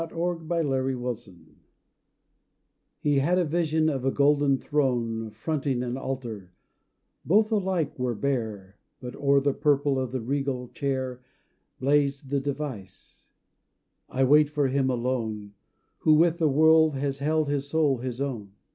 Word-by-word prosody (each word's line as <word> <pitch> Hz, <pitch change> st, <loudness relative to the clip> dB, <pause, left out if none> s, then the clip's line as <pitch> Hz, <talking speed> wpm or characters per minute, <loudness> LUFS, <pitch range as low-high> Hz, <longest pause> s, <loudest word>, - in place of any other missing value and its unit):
THRONE 170 Hz, -1 st, -3 dB
AND 135 Hz, -6 st, 0 dB
ALTAR 120 Hz, -5 st, -5 dB, 1.7 s
He 145 Hz, -2 st, +2 dB
had 175 Hz, +7 st, +2 dB
a 180 Hz, -, +2 dB
vision 160 Hz, 0 st, +1 dB
of 135 Hz, -5 st, -1 dB
a 135 Hz, -, +2 dB
golden 140 Hz, 0 st, +3 dB
throne 120 Hz, -6 st, -1 dB
Fronting 135 Hz, +3 st, -2 dB
an 125 Hz, 0 st, -3 dB
altar; 120 Hz, -9 st, -6 dB, 0.7 s
both 215 Hz, +5 st, +3 dB
alike 185 Hz, -9 st, -1 dB
were 125 Hz, -2 st, -1 dB
bare, 110 Hz, -7 st, -3 dB, 0.2 s
But 125 Hz, -1 st, -8 dB
o'er 140 Hz, 0 st, +3 dB
the 140 Hz, 0 st, +1 dB
purple 145 Hz, -2 st, +1 dB
of 130 Hz, -2 st, -3 dB
the 130 Hz, -, -2 dB
regal 130 Hz, 0 st, -2 dB
chair 130 Hz, -3 st, -3 dB, 0.6 s
Blazed 140 Hz, 0 st, +1 dB
the 140 Hz, -, +2 dB
device, 135 Hz, -9 st, -7 dB, 0.8 s
"I 135 Hz, -, 0 dB
wait 150 Hz, +2 st, +5 dB
for 145 Hz, -2 st, 0 dB
him 135 Hz, 0 st, +1 dB
alone 115 Hz, -5 st, -2 dB, 0.5 s
Who 155 Hz, -, +4 dB
with 170 Hz, +2 st, +3 dB
the 160 Hz, -2 st, +3 dB
world 160 Hz, +1 st, +5 dB
has 135 Hz, 0 st, -2 dB
held 155 Hz, +1 st, +1 dB
his 140 Hz, -1 st, -2 dB
soul 145 Hz, -5 st, +2 dB
his 125 Hz, 0 st, -5 dB
own." 115 Hz, -8 st, -4 dB
140 Hz, 140 wpm, -26 LUFS, 125-150 Hz, 1.7 s, wait